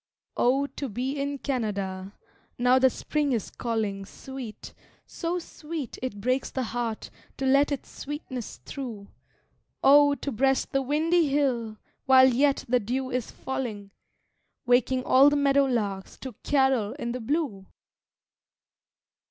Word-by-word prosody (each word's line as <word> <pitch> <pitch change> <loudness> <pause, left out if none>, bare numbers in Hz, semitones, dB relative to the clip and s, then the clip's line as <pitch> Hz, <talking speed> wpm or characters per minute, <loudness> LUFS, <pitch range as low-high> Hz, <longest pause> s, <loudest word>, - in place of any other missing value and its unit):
Oh, 270 +3 +2
to 280 -1 -6
be 250 +5 -2
in 280 0 -2
Canada, 200 -7 -3 0.4
now 250 +1 +4
that 260 0 +5
Spring 290 +2 -1
is 225 -5 -2
calling 215 -4 -2
Sweet, 255 +2 -9 0.3
so 340 +1 -3
sweet 315 -4 -7
it 250 -5 -4
breaks 255 +5 0
the 260 - -2
heart 230 -1 -4 0.3
to 270 - -2
let 280 +2 +4
its 280 - -4
sweetness 275 -5 -6
through, 230 -8 -7 0.7
Oh, 285 +1 +7
to 280 +1 -4
breast 270 +3 +1
the 270 - +1
windy 315 +5 +2
hill 250 -6 0 0.3
while 260 0 +8
yet 275 +3 +2
the 250 +1 +3
dew 255 +4 -3
is 250 -2 -2
falling 215 -7 -5 0.7
Waking 250 +1 +3
all 270 +3 +6
the 290 - 0
meadow 280 -1 +3
larks 205 -7 -2
to 260 -2 -6
carol 265 -7 +2
in 235 - -4
the 250 - -4
blue! 225 - -2
260 Hz, 135 wpm, -27 LUFS, 230-280 Hz, 0.7 s, while